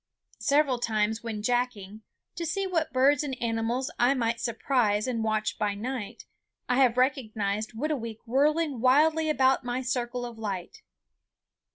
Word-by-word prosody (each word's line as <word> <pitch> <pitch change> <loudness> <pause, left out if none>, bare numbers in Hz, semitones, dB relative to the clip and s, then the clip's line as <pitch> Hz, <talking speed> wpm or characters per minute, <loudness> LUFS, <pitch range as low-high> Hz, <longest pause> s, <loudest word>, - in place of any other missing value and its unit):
Several 280 -3 +2
times 220 -1 0
when 220 -3 -5
jacking, 220 -4 -1 0.3
to 340 - -5
see 390 +4 -1
what 335 -4 -1
birds 270 +2 +4
and 265 -3 -4
animals 235 +4 -1
I 245 +3 +4
might 230 -2 0
surprise 230 -3 +1
and 235 -3 -2
watch 215 -1 -1
by 205 -1 0
night, 230 0 -5 0.4
I 250 - +1
have 255 -3 +4
recognized 220 -5 0
Whitooweek 230 -3 -3
whirling 290 +3 +1
wildly 310 +5 +4
about 265 -3 +3
my 245 +1 -2
circle 245 -1 -2
of 235 -2 -9
light. 200 - -5
245 Hz, 145 wpm, -27 LUFS, 220-270 Hz, 0.4 s, birds